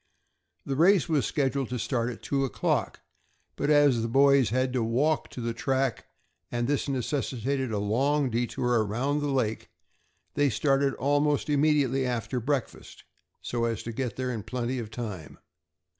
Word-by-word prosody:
The 135 - -2
race 175 +3 +4
was 155 -5 +1
scheduled 135 -3 -1
to 125 - -3
start 115 +1 -1
at 120 - -8
two 135 -1 0
o'clock, 135 - -1 0.5
but - - -1
as 145 -5 +4
the 115 - -1
boys 135 0 +4
had 130 +2 0
to 125 - 0
walk 135 +8 +1
to 125 - -7
the 115 0 -2
track, 135 +1 -1 0.4
and 120 0 -1
this 145 0 0
necessitated 130 -1 -2
a 105 - -1
long 130 +7 +1
detour 120 0 0
around 130 +8 -1
the 145 - -2
lake, 120 -5 -1 0.6
they 145 -1 +2
started 135 +4 +1
almost 145 +2 +1
immediately 140 -3 +2
after 125 0 -2
breakfast, 135 +1 -4 0.4
so 120 -1 -1
as 115 -2 -2
to 115 - -5
get 120 -2 -3
there 130 -1 -2
in 115 -3 -4
plenty 125 +3 -3
of 110 -3 -6
time. 105 -9 -7
130 Hz, 160 wpm, -27 LUFS, 115-140 Hz, 0.6 s, race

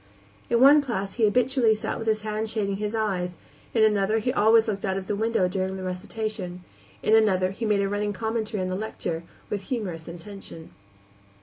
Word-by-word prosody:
In 235 - +3
one 285 +4 +8
class 200 -8 -3
he 230 - +2
habitually 240 +1 +3
sat 215 - -3
with 225 - -5
his 215 -1 +2
hand 215 0 -2
shading 200 -3 -1
his 210 +2 -3
eyes; 180 -5 -1 0.3
in 225 - +3
another 210 0 +3
he 245 +3 0
always 225 0 +5
looked 200 -2 -2
out 190 -1 0
of 190 - -4
the 205 - -1
window 220 -3 +1
during 190 +1 -2
the 190 - -6
recitation; 185 -1 -4 0.4
in 215 - +3
another 190 -4 +3
he 225 +4 -4
made 210 -2 +2
a 200 - +1
running 205 +1 -1
commentary 220 -1 -2
on - - -2
the 185 - -2
lecture, 185 -5 -4 0.3
with 200 -2 -3
humorous 185 -10 -3
intention. 170 -1 -9
210 Hz, 195 wpm, -26 LUFS, 190-220 Hz, 0.4 s, one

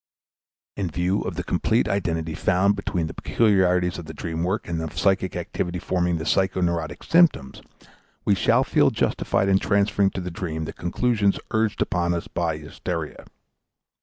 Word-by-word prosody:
In 95 -3 -2
view 90 +4 0
of - - -4
the - - -3
complete - - +1
identity 80 -5 -1
found 95 +5 +2
between 95 -4 -2
the 80 - -6
peculiarities 90 -5 +2
of 85 - -8
the 80 0 -9
dream 80 +1 -3
work 95 +5 -1
and 85 -1 -2
of 80 - -3
the - - -15
psychic 95 -2 +1
activity 90 +1 -3
forming 90 -1 0
the 80 - -4
psychoneurotic 85 -4 0
symptoms, 165 - +3 0.6
we 105 - +4
shall 95 - +3
feel - - +3
justified 95 - 0
in 95 0 +4
transferring 100 -1 +2
to 95 - -5
the 90 0 -5
dream 80 -2 -4
the - - -6
conclusions 100 +2 0
urged 110 -1 +1
upon 85 0 0
us 85 - -4
by 85 -2 -2
hysteria. 80 +1 -6
90 Hz, 165 wpm, -24 LUFS, 85-100 Hz, 0.6 s, we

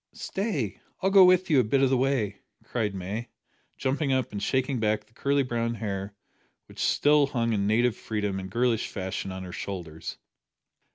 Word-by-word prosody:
"Stay, 180 - -3 0.2
I'll 190 - +3
go 195 -1 +9
with 185 0 +5
you 145 - +6
a - - +5
bit 135 +5 +2
of 135 - +3
the - - +4
way," 130 -5 0 0.2
cried 105 -5 -2
May, 100 +6 -4 0.5
jumping 135 +1 0
up 130 -3 0
and 100 -1 -4
shaking 130 +3 0
back 110 -1 0
the - - -30
curly 140 +3 +1
brown 115 -2 -1
hair 100 -2 -4 0.5
which - - -14
still 145 -1 +4
hung 115 -4 0
in 100 -1 +1
native 115 +1 +3
freedom 105 -3 -2
and 95 0 -6
girlish 120 +1 +1
fashion 95 -1 -4
on 95 0 -6
her 90 - -7
shoulders. 85 -4 -6
115 Hz, 180 wpm, -27 LUFS, 100-135 Hz, 0.5 s, go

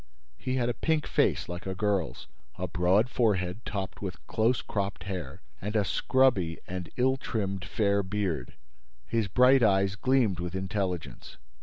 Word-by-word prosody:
He 130 - -2
had 120 -2 +1
a 120 - +1
pink 160 +3 0
face - - +1
like 85 +1 -6
a 95 - -3
girl's, 100 -3 -1 0.3
a 90 - -2
broad 90 +6 +3
forehead 105 -4 0
topped 100 -2 -4
with 95 -3 -6
close 115 +2 +1
cropped 100 -1 -3
hair, 90 -8 -6 0.2
and 105 +4 -4
a 105 -2 +3
scrubby 110 -10 +2
and 90 -3 -5
ill 130 +2 +3
trimmed 100 -7 -3
fair 100 0 +1
beard. 95 -9 -2 0.5
His 115 -3 0
bright 125 +6 +5
eyes 100 -3 +3
gleamed 120 -6 +2
with 90 +1 -4
intelligence. 95 - -3
100 Hz, 155 wpm, -29 LUFS, 90-115 Hz, 0.5 s, bright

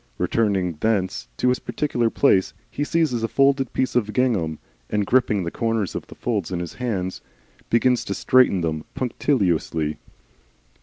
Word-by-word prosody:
Returning 95 -7 0
thence 100 - 0
to 125 - +2
his 125 - +1
particular 120 -6 -1
place, 100 -7 +2 0.2
he - - -5
lays 145 - -3
hands 165 -5 +2
on 115 -2 -2
a - - +1
folded 135 +1 +2
piece 130 - -1
of 105 -4 +1
gingham, 100 -11 +1 0.3
and 105 -1 0
gripping 105 -4 +2
the 85 - -3
corners 115 -5 -1
of - - -5
the - - -12
folds 105 -7 -2
in 90 - -2
his 85 -2 -5
hands, 100 -7 -3 0.5
begins 125 +1 +3
to 100 - -3
straighten 125 -8 +4
them 80 -2 -2
punctiliously. 90 - 0
110 Hz, 165 wpm, -23 LUFS, 90-125 Hz, 0.5 s, straighten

